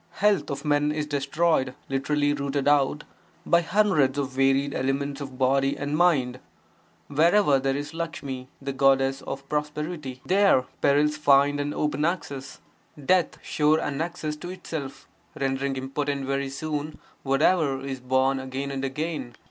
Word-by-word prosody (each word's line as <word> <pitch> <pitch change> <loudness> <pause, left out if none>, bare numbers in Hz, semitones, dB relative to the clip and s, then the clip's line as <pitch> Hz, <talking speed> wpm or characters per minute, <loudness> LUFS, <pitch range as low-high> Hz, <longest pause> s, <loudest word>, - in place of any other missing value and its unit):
Health 205 -1 +2
of 140 +2 -5
men 145 0 +2
is 150 0 -2
destroyed 145 -1 0
(lit. 135 +1 -3
rooted 145 -1 0
out) 145 0 +3 0.4
by 170 0 +4
hundreds 165 -8 +2
of 140 -2 -1
varied 135 +1 +2
ailments 140 +2 -2
of 135 -2 -7
body 135 +1 +2
and 145 +1 -2
mind; 140 -7 +2 0.7
wherever 160 0 +4
there 135 +1 0
is 145 +2 -5
Lakshmi 145 -6 -5
(the 140 0 -4
goddess 135 0 +3
of 135 0 -7
prosperity), 150 -2 -3
there 190 -9 +4 0.2
perils 150 +2 +3
find 145 -1 +4
an 145 0 -1
open 150 -1 -1
access; 145 -5 -3 0.4
death 185 +1 +2
sure 155 +1 +2
annexes 155 +1 -3
to 175 - -8
itself, 160 -7 -7 0.3
rendering 135 0 -1
impotent 135 +1 -2
very 135 0 -1
soon, 150 +2 -4 0.2
whatever 140 0 +2
is 135 -1 -4
born 130 +1 +1
again 130 +1 -4
and 135 0 -4
again. 135 -2 -3
140 Hz, 140 wpm, -25 LUFS, 135-150 Hz, 0.7 s, by